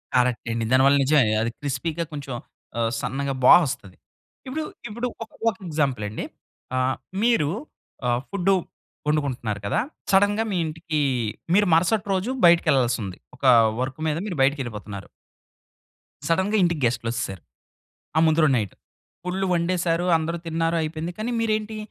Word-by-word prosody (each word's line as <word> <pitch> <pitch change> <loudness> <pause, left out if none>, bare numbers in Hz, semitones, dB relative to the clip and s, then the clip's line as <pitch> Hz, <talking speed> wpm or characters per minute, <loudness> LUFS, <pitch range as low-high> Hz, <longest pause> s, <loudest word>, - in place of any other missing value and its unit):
Correct 125 -2 +2
అండి. 115 0 -1
దానివల్ల 135 +2 +5
నిజమే 135 -6 +4
అది 115 +1 -1
క్రిస్పీగా 150 +4 -2
కొంచెం 140 -3 -5 0.5
ఆహ్, 115 -1 +1
సన్నగా 140 +1 -2
బా - - +10
వస్తది. 95 -8 -5 0.5
ఇప్పుడు, 305 +5 -3 0.3
ఇప్పుడు 235 +4 -3 0.2
ఒక, 220 - -14 0.2
ఒక 205 - -6
ఎగ్జాంపుల్ 140 -7 0
అండి. 105 - -5 0.5
ఆహ్, 130 +1 +1 0.3
మీరు 230 -12 +3 0.6
ఆహ్, 120 0 +1
ఫుడ్డు 195 -1 +2 0.5
వండుకుంటున్నారు 130 -8 -1
కదా! 100 - +1 0.3
సడెన్‌గా 205 +3 +4
మీ 190 - 0
ఇంటికి 155 0 -3 0.5
మీరు 205 +1 +4
మరుసటి 195 +5 +2
రోజు 195 +7 -1
బయటికెళ్ళాల్సి 135 -8 +4
ఉంది. 95 -2 -6 0.2
ఒక 135 - -7 0.4
వర్క్ 130 +3 -3
మీద 155 0 0
మీరు 185 - -4
బయటికెళ్ళిపోతున్నారు. 115 -8 -1 1.2
సడెన్‌గా 190 +6 +2
ఇంటికి 170 -4 +1
గెస్ట్‌లొచ్చేసారు. 115 -5 -2 0.8
ఆ - - +5
ముందు 160 +1 +3
రోజు 145 -4 +4
నైట్. 105 -5 -2 0.5
ఫుల్లు 190 +2 -1
వండేసారు. 170 0 0
అందరూ 165 +2 -2
తిన్నారు, 165 +1 0
అయిపోయింది. 160 +2 -4
కానీ 225 +3 -2
మీరేంటి, 215 -1 -1
155 Hz, 135 wpm, -24 LUFS, 125-180 Hz, 1.2 s, బా